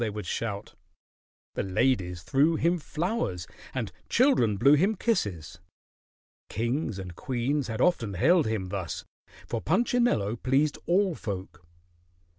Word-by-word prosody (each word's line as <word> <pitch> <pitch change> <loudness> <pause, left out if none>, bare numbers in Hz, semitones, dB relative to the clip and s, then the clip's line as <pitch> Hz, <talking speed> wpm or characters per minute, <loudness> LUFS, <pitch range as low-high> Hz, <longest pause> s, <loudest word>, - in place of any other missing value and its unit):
they 115 - +1
would 105 0 -6
shout. 105 -3 -4 0.8
The - - -1
ladies 95 -3 0
threw 140 - +3
him 170 +2 +1
flowers 150 - -2 0.3
and - - -3 0.2
children 180 - +3
blew 140 +8 +6
him 190 +9 +3
kisses. 100 - -1 0.9
Kings 120 0 -1
and 90 -3 -7
queens 130 +5 -1
had 110 -2 -3
often 115 - +2
hailed 165 - +4
him 105 -4 -2
thus, 95 -3 -4 0.4
for 115 - -3
Punchinello 185 - +1
pleased 140 +5 +1
all 190 +1 +3
folk. 95 - -6
120 Hz, 125 wpm, -28 LUFS, 100-165 Hz, 0.9 s, blew